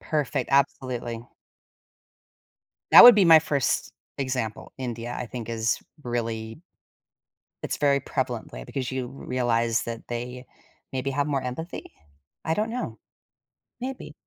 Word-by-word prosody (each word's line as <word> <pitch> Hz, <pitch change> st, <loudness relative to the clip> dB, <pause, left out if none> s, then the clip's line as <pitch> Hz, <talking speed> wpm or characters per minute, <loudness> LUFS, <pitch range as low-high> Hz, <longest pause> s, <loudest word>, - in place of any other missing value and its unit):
Perfect, 145 Hz, -4 st, -1 dB
absolutely. 125 Hz, -3 st, 0 dB, 1.6 s
That -, -, +12 dB
would 245 Hz, -, +12 dB
be 205 Hz, -3 st, +5 dB
my 165 Hz, -1 st, +9 dB
first 150 Hz, -4 st, -1 dB, 0.3 s
example. 125 Hz, -5 st, -3 dB
India, 120 Hz, -1 st, -4 dB
I -, -, -4 dB
think 115 Hz, -1 st, -7 dB
is 115 Hz, -1 st, 0 dB, 0.2 s
really 115 Hz, 0 st, -4 dB, 1.0 s
it's -, -, -3 dB
very 140 Hz, -1 st, +3 dB
prevalently -, -, -4 dB
because 130 Hz, -1 st, -4 dB
you 130 Hz, -1 st, -2 dB
r 135 Hz, +2 st, -11 dB
realize 120 Hz, -2 st, +1 dB
that 115 Hz, -1 st, -6 dB
they 125 Hz, +1 st, -5 dB, 0.5 s
maybe 130 Hz, +1 st, -2 dB
have 140 Hz, +1 st, 0 dB
more 140 Hz, -3 st, 0 dB
empathy? 125 Hz, +8 st, -6 dB, 0.5 s
I 160 Hz, -, 0 dB
don't 215 Hz, +6 st, 0 dB
know. 245 Hz, +2 st, -4 dB, 0.8 s
Maybe. 255 Hz, -, -6 dB
130 Hz, 125 wpm, -25 LUFS, 120-145 Hz, 1.6 s, That